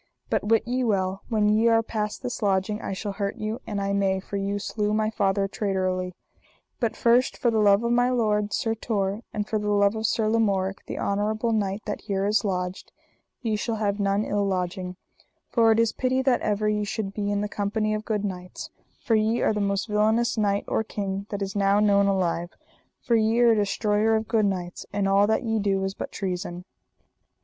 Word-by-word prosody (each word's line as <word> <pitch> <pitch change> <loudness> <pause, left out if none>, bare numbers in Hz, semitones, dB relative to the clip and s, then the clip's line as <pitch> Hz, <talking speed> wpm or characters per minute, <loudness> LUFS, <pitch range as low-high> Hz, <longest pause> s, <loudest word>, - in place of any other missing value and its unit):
But - - +1
wit 225 +1 +3
ye 255 +1 0
well, 195 -4 0
when 215 -3 +2
ye 215 +2 +3
are 225 0 +4
past 215 0 -3
this 245 -1 -4
lodging 200 +1 0
I - - -4
shall 200 +2 -4
hurt 200 0 -3
you 215 +2 -4
an 205 -2 -2
I 200 0 -1
may, 195 -1 +1
for 195 - -8
ye 200 +1 -1
slew 210 +1 -1
my 215 0 +1
father 195 -2 +1
traitorly. 185 -3 -2 0.6
But 230 -3 0
first 240 +2 +3
for 240 - +1
the 220 - +1
love 205 +1 +4
of 235 - 0
my 245 +1 +3
lord, 210 -4 +1
Sir 225 +2 0
Tor, 210 -2 -2
and 210 -1 -3
for 215 - -1
the 210 0 -2
love 205 0 +3
of 220 0 -1
Sir 220 -1 +1
Lamorak, 200 -4 0
the - - -5
honourable 215 +3 0
knight 200 -1 -1
that 210 - -4
here 195 -2 -1
is 210 +2 +2
lodged, 180 -2 -3 0.5
ye 220 -2 0
shall 225 +2 -2
have 205 -1 -1
none 200 +1 +1
ill 205 0 0
lodging; 185 -1 -2 0.6
for 230 -2 +4
it 220 - +3
is 230 -1 +2
pity 260 0 0
that 260 -2 +2
ever 210 0 0
ye 210 0 +1
should 205 -1 -3
be 205 -1 -2
in 205 0 0
the 210 - -1
company 215 +1 -1
of 215 0 -2
good 210 -2 -1
knights; 180 -2 -6 0.3
for 230 - 0
ye 220 +2 +2
are - - +3
the 210 - -1
most 200 +1 0
villainous 220 +2 +2
knight 205 -2 0
or - - 0
king 200 -2 -4
that 200 -1 -3
is 195 0 -5
now 200 0 +3
known 200 -1 +4
alive, 175 -3 0 0.5
for 235 - +2
ye 225 +1 +2
are 240 -1 +6
a - - +4
destroyer 210 +1 +1
of 220 0 -1
good 220 -3 +2
knights, 180 -2 -4
and 200 -1 0
all 200 +1 +4
that 220 - +1
ye 225 -1 0
do 195 -1 0
is 195 0 -2
but - - -6
treason. 180 -2 -4
210 Hz, 215 wpm, -25 LUFS, 195-220 Hz, 0.6 s, are